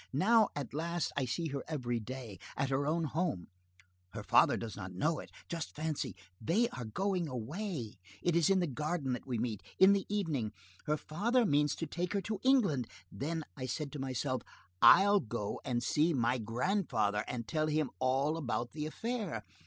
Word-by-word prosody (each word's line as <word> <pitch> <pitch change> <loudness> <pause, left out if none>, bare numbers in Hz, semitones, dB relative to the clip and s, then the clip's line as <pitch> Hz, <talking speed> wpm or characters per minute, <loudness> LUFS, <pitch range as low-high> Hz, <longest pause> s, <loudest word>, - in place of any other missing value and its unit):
Now, 215 - +5
at 145 -2 -4
last, 170 +3 -1
I 140 - +1
see 160 +7 -2
her 140 -1 -3
every 125 -6 -1
day, 115 -4 -7 0.2
at 140 -2 0
her 140 +2 +1
own 165 +2 +1
home, 155 - -1 0.6
her - - -5
father - - +5
does 110 -3 -5
not 95 -2 -7
know 155 - 0
it, - - -9 0.2
just 165 -2 -5
fancy, 150 - -2 0.3
they 205 - +3
are 125 -2 -6
going 180 - -1
away, 130 - -4 0.2
it 175 -1 +2
is 170 +2 +4
in 190 -1 +4
the - - +2
garden 150 -1 -2
that 125 - -5
we 125 -3 -1
meet, 110 -3 -2 0.2
in 190 +1 +8
the 200 -1 0
evening, 155 - -1 0.3
her 150 +1 +2
father 230 - +1
means 145 -4 +3
to 165 - -3
take 175 +4 -3
her 200 - +1
to 215 0 -3
England, 200 - +3 0.2
then 160 +3 -3
I 130 -3 -4
said 145 +3 -3
to 145 - -6
myself: 130 -1 -1 0.4
'I'll 200 +2 +8
go 110 - -4
and 120 -1 -1
see 155 +5 +2
my 125 0 +2
grandfather 115 - 0
and 115 -2 -4
tell 155 -1 0
him 155 -1 0
all 135 +5 +2
about 120 -5 -2
the 150 -1 -3
affair. 205 - -3
150 Hz, 185 wpm, -33 LUFS, 125-175 Hz, 0.6 s, in